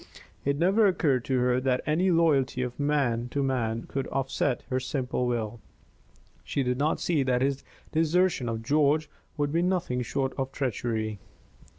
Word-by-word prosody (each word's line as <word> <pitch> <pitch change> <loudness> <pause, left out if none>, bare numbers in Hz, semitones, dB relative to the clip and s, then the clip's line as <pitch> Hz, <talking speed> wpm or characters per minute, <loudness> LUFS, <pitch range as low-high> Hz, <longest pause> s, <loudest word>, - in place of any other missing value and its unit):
It 140 0 0
never 195 +6 +4
occurred 145 -9 +2
to 130 - +1
her 125 0 +2
that 130 -1 +1
any 165 +5 +2
loyalty 145 -7 +2
of 125 +1 -5
man 135 -5 +1
to 140 +2 -1
man 115 -4 -1
could 135 -1 -4
offset 135 -1 -1
her 130 - +1
simple 125 -1 -2
will. 115 -2 -2 0.8
She 140 - -1
did 125 0 -1
not 150 +2 +1
see 165 -5 +1
that 130 -1 +1
his 140 0 -1 0.3
desertion 165 -4 +2
of 115 0 -3
George 150 +3 +2 0.3
would 145 -1 0
be 165 +2 +2
nothing 175 -9 0
short 135 +2 -2
of 135 0 -2
treachery. 110 -5 -2
135 Hz, 165 wpm, -27 LUFS, 125-150 Hz, 0.8 s, never